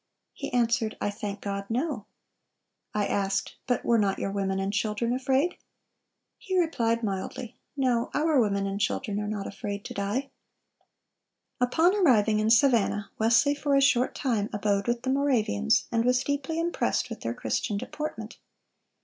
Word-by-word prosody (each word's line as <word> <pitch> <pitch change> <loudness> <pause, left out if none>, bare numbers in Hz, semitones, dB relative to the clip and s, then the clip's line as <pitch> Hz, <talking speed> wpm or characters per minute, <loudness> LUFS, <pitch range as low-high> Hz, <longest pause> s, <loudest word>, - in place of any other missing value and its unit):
He - - -6
answered, 235 -2 +1
'I 205 - -1
thank 205 0 -6
God, 200 -1 -3
no,' 245 -2 -2 0.8
I 210 -1 0
asked, 195 0 -1
'But 245 -2 0
were 235 -1 +4
not 195 -2 +1
your 195 - -2
women 195 -1 -1
and 195 +1 -2
children 215 +3 0
afraid?' 265 +6 +1 0.8
He 375 -1 -2
replied 235 -9 +1
mildly, 215 +4 -4 0.2
'No; 250 -3 +1
our 305 -3 +3
women 200 -2 0
and 195 +1 -3
children 205 -1 -1
are 210 - -3
not 205 -2 -3
afraid 200 0 -5
to - - -6
die.' 210 +8 -2 1.3
"(371) 250 - +4
Upon 335 +9 +3
arriving 220 - +4
in 215 +1 +1
Savannah, 225 -4 +3
Wesley 230 +6 +4
for 290 -1 0
a - - +5
short 255 -2 +3
time 225 -7 0
abode 205 -1 0
with 240 0 -1
the 260 - 0
Moravians, 235 -5 +2
and 230 -1 +2
was 250 +1 +2
deeply 285 +3 -2
impressed 340 +1 0
with - - -6
their - - -3
Christian 205 - -2
deportment. 225 -3 -6
230 Hz, 160 wpm, -27 LUFS, 205-265 Hz, 1.3 s, a